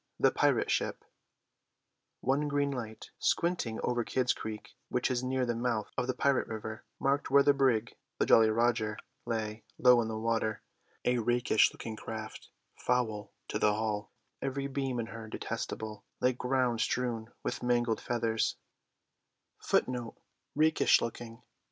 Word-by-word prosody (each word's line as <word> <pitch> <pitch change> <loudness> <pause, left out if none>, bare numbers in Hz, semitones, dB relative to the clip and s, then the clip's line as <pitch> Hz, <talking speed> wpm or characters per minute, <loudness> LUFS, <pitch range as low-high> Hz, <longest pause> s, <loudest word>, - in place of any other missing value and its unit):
THE - - +5
PIRATE - - +2
SHIP - - -1 1.2
One 140 +3 +1
green 145 0 +1
light 110 -4 -6
squinting 170 -10 0
over 120 -1 +1
Kidd's 125 +2 +1
Creek, 110 -1 -7
which 125 +1 0
is 125 0 0
near 130 0 0
the 120 - 0
mouth 115 -2 -1
of 125 - -1
the 130 - -1
pirate 140 -1 +2
river, 110 0 -6 0.2
marked 140 +1 +1
where 140 +1 +6
the 145 - +5
brig, 125 -5 +2 0.2
the - - +2
Jolly 110 -1 +6
Roger, 110 -1 +1 0.3
lay, 110 -1 -2
low 125 -1 +6
in 115 - -2
the 110 -1 -3
water; 110 -1 -1 0.4
a 125 0 +3
rakish 120 -1 +3
looking 110 - -7
craft 110 0 -7 0.3
foul 110 -5 0 0.2
to 105 - -1
the 105 -1 +3
hull, 105 -1 -2 0.3
every 135 +1 -2
beam 135 -2 -2
in 115 - -1
her 115 -1 -8
detestable, 110 -1 -5 0.2
like 125 -1 +1
ground 125 -3 +1
strewn 120 -3 -1
with - - -3
mangled 120 -2 +1
feathers. 115 -2 0
120 Hz, 140 wpm, -31 LUFS, 110-130 Hz, 1.2 s, where